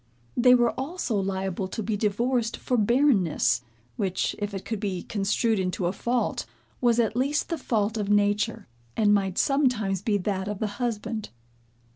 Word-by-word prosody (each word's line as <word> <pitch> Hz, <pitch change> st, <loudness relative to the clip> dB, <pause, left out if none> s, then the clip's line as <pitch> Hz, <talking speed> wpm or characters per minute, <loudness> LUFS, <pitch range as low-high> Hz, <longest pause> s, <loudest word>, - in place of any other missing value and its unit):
They 250 Hz, +1 st, +6 dB
were 240 Hz, -1 st, +3 dB
also 275 Hz, -4 st, -2 dB
liable 190 Hz, -1 st, -2 dB
to 220 Hz, +4 st, -4 dB
be 215 Hz, +1 st, -1 dB
divorced 230 Hz, +3 st, 0 dB
for 250 Hz, -, -1 dB
barrenness, 205 Hz, -, +3 dB, 0.4 s
which, 190 Hz, -2 st, -1 dB
if 205 Hz, 0 st, -2 dB
it 195 Hz, -1 st, -6 dB
could 220 Hz, -3 st, -3 dB
be 195 Hz, -4 st, -3 dB
construed 210 Hz, +2 st, 0 dB
into 185 Hz, -1 st, -1 dB
a 175 Hz, -, 0 dB
fault, 240 Hz, +4 st, -1 dB, 0.3 s
was 240 Hz, -1 st, +3 dB
at 225 Hz, -1 st, +1 dB
least 280 Hz, +4 st, 0 dB
the 335 Hz, -, -1 dB
fault 220 Hz, -3 st, 0 dB
of 205 Hz, -2 st, -2 dB
nature, 205 Hz, +2 st, +1 dB, 0.3 s
and 210 Hz, -2 st, +4 dB
might 195 Hz, -2 st, +1 dB
sometimes 245 Hz, -, +1 dB
be 205 Hz, 0 st, +1 dB
that 190 Hz, 0 st, -2 dB
of 210 Hz, -1 st, -3 dB
the 215 Hz, -, -1 dB, 0.2 s
husband. 225 Hz, -2 st, -2 dB
210 Hz, 165 wpm, -26 LUFS, 195-240 Hz, 0.4 s, They